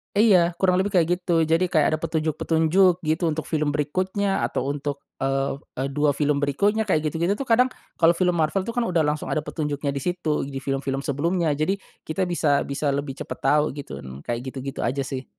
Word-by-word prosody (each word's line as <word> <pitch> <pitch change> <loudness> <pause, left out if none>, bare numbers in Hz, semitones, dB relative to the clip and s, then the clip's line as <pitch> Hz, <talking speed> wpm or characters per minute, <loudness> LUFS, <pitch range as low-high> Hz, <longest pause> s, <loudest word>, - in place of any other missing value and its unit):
Iya, 185 -5 +5
kurang 185 -1 +2
lebih 195 0 -1
kayak 165 -2 +4
gitu 175 -2 +2
jadi 165 +3 +2
kayak 155 -4 +3
ada 155 - 0
petunjuk-petunjuk 165 +3 +2
gitu 160 +3 0
untuk 160 -1 -1
film 150 -2 0
berikutnya 185 +7 0
atau 125 - -2
untuk, 145 -1 -4 0.2
eee 135 +1 -1 0.2
eee, 135 +2 -1
2 145 0 +1
film 145 0 +1
berikutnya 205 +10 +1
kayak 160 -5 +2
gitu-gitu 170 +5 0
tuh 275 - -4
kadang 250 +3 +5 0.3
kalau 170 0 +5
film 180 +1 +2
Marvel 160 +5 +1
tuh 230 - -4
kan 235 0 -1
udah 165 -3 +2
langsung 150 0 -1
ada 155 -1 -1
petunjuknya 145 -2 -2
di 140 - -3
situ, 160 -3 -1
di 135 -1 -5
film-film 135 0 -2
sebelumnya, 165 +4 0
jadi 155 +7 0 0.3
kita 160 +4 -1
bisa 145 -4 +2
bisa 140 +1 -3
lebih 140 -1 -3
cepat - - -6
tahu 150 0 +4
gitu, 145 -1 -7 0.2
kayak 120 0 -2
gitu-gitu 135 +1 -6
aja 135 +3 0
sih. 130 -1 -5
155 Hz, 195 wpm, -24 LUFS, 140-180 Hz, 0.3 s, Iya